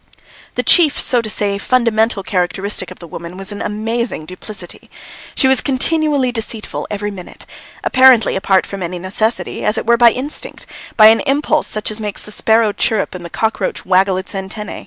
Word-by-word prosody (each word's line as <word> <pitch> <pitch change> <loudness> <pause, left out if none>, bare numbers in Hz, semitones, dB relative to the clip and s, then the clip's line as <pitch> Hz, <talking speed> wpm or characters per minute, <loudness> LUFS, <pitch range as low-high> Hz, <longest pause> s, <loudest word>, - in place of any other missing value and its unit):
The - - -1
chief, 315 -5 +4
so 245 -4 +3
to 220 - -5
say 200 -1 -1
fundamental, 225 -3 +1
characteristic 190 +2 -2
of 185 - -11
the 175 - -11
woman 170 +2 -9
was 195 +2 -4
an 205 - -6
amazing 225 -3 -3
duplicity. 185 +1 -9 0.5
She 265 - +3
was 265 -1 +3
continually 285 -1 +1
deceitful 225 -2 -4
every 205 0 -3
minute, 185 -3 -11 0.4
apparently 255 -4 +5
apart 190 -1 +2
from 195 -1 -7
any 180 0 -4
necessity, 210 +6 -2
as 210 - 0
it - - -3
were 235 +1 +4
by 240 0 +7
instinct, 265 +6 -6 0.3
by 215 -1 +9
an 225 - +4
impulse 295 +2 +1
such 215 0 -3
as 215 +1 -5
makes 210 -2 -5
the 210 - -10
sparrow 220 0 +2
chirrup 215 -1 -1
and 180 -1 -8
the 170 - -7
cockroach 220 +4 -2
waggle 190 0 +2
its 190 - -6
antennæ. 200 +2 -6
215 Hz, 180 wpm, -16 LUFS, 195-235 Hz, 0.5 s, by